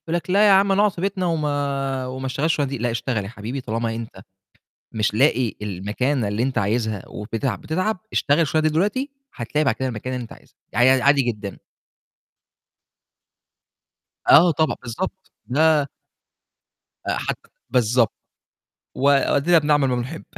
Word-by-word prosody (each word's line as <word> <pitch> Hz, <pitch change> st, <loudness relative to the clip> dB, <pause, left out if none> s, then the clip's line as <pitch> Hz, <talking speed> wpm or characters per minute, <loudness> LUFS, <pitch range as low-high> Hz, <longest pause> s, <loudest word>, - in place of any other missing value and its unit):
لك 170 Hz, 0 st, -4 dB
لأ 205 Hz, +3 st, +5 dB
يا -, -, +6 dB
عم 195 Hz, +1 st, +5 dB
أنا 195 Hz, +1 st, +3 dB
أقعد 210 Hz, -1 st, +3 dB
في 170 Hz, -, -8 dB
بيتنا 190 Hz, -1 st, -1 dB
وما 140 Hz, -4 st, -1 dB
وما 130 Hz, +1 st, -6 dB
أشتغلش 140 Hz, +3 st, -2 dB
الشُغلانة 145 Hz, -3 st, -1 dB
دي، 140 Hz, -, -3 dB
لأ 120 Hz, +1 st, -1 dB
اشتغل 115 Hz, -2 st, -2 dB
يا 100 Hz, -, -7 dB
حبيبي 120 Hz, +4 st, -6 dB
طالما 115 Hz, 0 st, -2 dB
أنت 115 Hz, 0 st, -8 dB, 0.7 s
مش 110 Hz, -1 st, 0 dB
لاقي 115 Hz, 0 st, +2 dB
المكانة 105 Hz, +6 st, -1 dB
اللي 105 Hz, +3 st, -1 dB
أنت 130 Hz, 0 st, -2 dB
عايزها 110 Hz, -1 st, -1 dB
وبتتعب 115 Hz, +5 st, -4 dB
بتتعب، 185 Hz, +6 st, -1 dB, 0.2 s
اشتغل 145 Hz, +1 st, +2 dB
الشُغلانة 155 Hz, 0 st, +2 dB
دي -, -, -5 dB
دلوقتي 205 Hz, -, 0 dB, 0.2 s
هتلاقي 145 Hz, +5 st, -1 dB
بعد -, -, +2 dB
كده 130 Hz, -, -2 dB
المكانة 125 Hz, +2 st, -4 dB
اللي 125 Hz, -, -4 dB
أنت 115 Hz, -, -11 dB
عايزها، -, -, -20 dB, 0.2 s
يعني 120 Hz, +5 st, +4 dB
ع -, -, -3 dB
عادي 140 Hz, 0 st, +5 dB
جدًا. 105 Hz, -5 st, -4 dB, 2.7 s
آه 170 Hz, +3 st, +8 dB
طبعًا، 155 Hz, +1 st, 0 dB
بالضبط، 190 Hz, +11 st, -6 dB, 0.2 s
لا 150 Hz, +2 st, +3 dB, 1.2 s
آآ -, -, 0 dB
حتى -, -, -5 dB, 0.2 s
بالضبط، 120 Hz, -2 st, +2 dB, 0.8 s
وأدينا 140 Hz, +4 st, +3 dB
بنعمَل 150 Hz, -2 st, +2 dB
ما 125 Hz, -, 0 dB
نحب. 125 Hz, +7 st, -5 dB
135 Hz, 155 wpm, -22 LUFS, 115-155 Hz, 2.7 s, آه